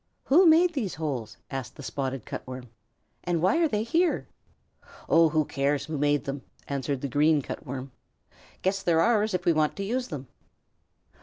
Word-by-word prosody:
"Who 345 +7 +5
made 335 +2 +5
those 230 - -2
holes?" 135 -9 -4
asked 135 -2 -5
the 145 - -10
Spotted 135 -3 -4
Cut - - -5
Worm; 125 -1 -8 0.5
"and 175 -1 0
why 185 - +3
are 335 -1 +3
they 215 -6 -1
here?" 330 +9 +1 0.8
"Oh, 165 -1 +5
who 155 -1 +1
cares 140 +1 0
who 155 -2 -4
made 145 0 +1
them?" 140 0 -4 0.3
answered 140 -1 -2
the 140 - -2
Green 150 +2 +3
Cut 145 - -7
Worm. 130 +1 -6 0.7
"Guess 195 +1 +1
they're 170 -3 +2
ours 215 0 +3
if 180 0 -3
we 170 - +4
want 155 -1 +1
to 200 - -4
use 245 +5 -2
them." 140 -6 -7
155 Hz, 180 wpm, -27 LUFS, 140-210 Hz, 0.8 s, Who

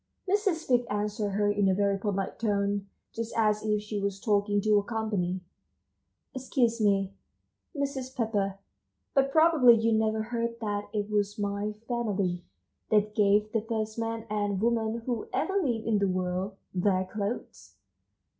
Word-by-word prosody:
Mrs. 390 -4 +1
Fig 245 -2 +2
answered 205 0 -1
her 205 +1 +2
in 205 -1 +2
a 190 - +3
very 200 0 +2
polite 195 -1 -2
tone, 200 -2 0 0.3
just 230 0 -4
as 215 -1 +3
if 210 -1 0
she 210 -1 -3
was 200 -1 -2
talking 205 0 +2
to 210 0 +3
company: 200 -5 -2 0.9
"Excuse 245 -3 0
me, 195 -2 +2 0.6
Mrs. 275 -2 -3
Pepper, 205 -5 -1 0.6
but 275 0 +3
probably 315 -6 +6
you 225 0 +2
never 220 0 +1
heard 235 0 -3
that 205 -2 -3
it 205 -1 -2
was 205 0 0
my 205 0 -2
family 200 -7 -1 0.5
that 210 0 +2
gave 210 0 +3
the 225 - +1
first 220 0 -3
man 225 0 -3
and 205 -2 -1
woman 230 0 0
who 240 -4 -2
ever 385 - -1
lived 240 -8 -1
in 220 -2 +2
the 200 - +2
world 185 +1 -2 0.2
their 185 0 +1
clothes!" 205 +4 -5
210 Hz, 150 wpm, -28 LUFS, 200-230 Hz, 0.9 s, probably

